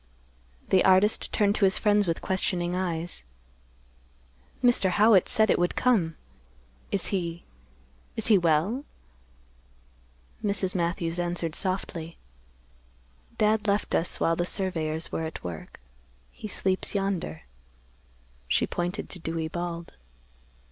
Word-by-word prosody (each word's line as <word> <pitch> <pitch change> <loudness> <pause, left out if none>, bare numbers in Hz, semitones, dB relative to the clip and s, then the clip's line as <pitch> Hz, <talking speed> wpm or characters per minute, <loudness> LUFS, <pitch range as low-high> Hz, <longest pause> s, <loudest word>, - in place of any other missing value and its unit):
The 190 - +5
artist 190 +3 +4
turned 205 -1 +2
to 200 - +4
his 190 - +4
friends 205 -2 +3
with 165 - -2
questioning 180 -2 0
eyes; 170 - -3 1.4
"Mr. 240 -6 +4
Howitt 205 0 +5
said 220 -1 +3
it - - +2
would 175 0 +1
come. 195 -11 +2 0.8
Is 195 - +1
he—is 65 - -6
he 220 - +6
well?" 175 - +2 1.6
Mrs. 195 -2 0
Matthews 170 -1 -1
answered 175 -2 -1
softly, 175 -3 -4 1.2
"Dad 215 0 +2
left 200 +1 0
us 165 - 0
while 165 - +2
the 175 - 0
surveyors 165 -4 -2
were 160 - -2
at 160 - -7
work. 85 -3 -7 0.5
He - - -8
sleeps 190 0 -1
yonder." 195 - -2 1.0
She - - +2
pointed 180 +4 -3
to 180 - -5
Dewey 165 -1 -3
Bald. 170 0 -5
180 Hz, 115 wpm, -27 LUFS, 165-200 Hz, 1.6 s, he